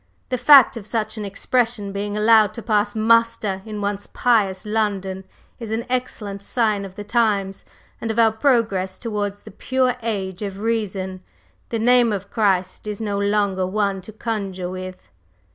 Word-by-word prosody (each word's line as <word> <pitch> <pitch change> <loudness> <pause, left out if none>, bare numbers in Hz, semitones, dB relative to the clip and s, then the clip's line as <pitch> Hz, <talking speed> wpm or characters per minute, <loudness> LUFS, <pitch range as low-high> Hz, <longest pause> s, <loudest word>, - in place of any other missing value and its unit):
The 255 - 0
fact 275 -4 +7
of 210 -3 -8
such 220 -1 -2
an 210 - -4
expression 215 +1 -1
being 205 +1 -3
allowed 215 -1 +5
to 230 - -7
pass 210 -2 +1
muster 220 -3 +2
in 210 -1 -5
once 200 0 -3
pious 210 -6 +1
London 200 -3 -2 0.3
is 230 -3 -6
an 225 +2 -2
excellent 215 -6 -3
sign 210 -2 0
of 190 -1 -11
the 205 - -6
times 205 -4 0 0.4
and 225 - -3
of 220 - -2
our 225 -1 +5
progress 220 -6 +1
towards 205 -3 -4
the - - -11
pure 255 +4 0
Age 195 -4 -3
of 200 -2 -4
Reason. 195 -4 -2 0.5
The 230 - -1
name 240 0 +4
of 200 -1 -4
Christ 190 -2 0
is 210 -1 -4
no 205 -2 -2
longer 200 -2 +1
one 200 -1 -1
to 190 - -11
conjure 200 -5 -4
with." 185 0 -8
210 Hz, 165 wpm, -22 LUFS, 195-225 Hz, 0.5 s, fact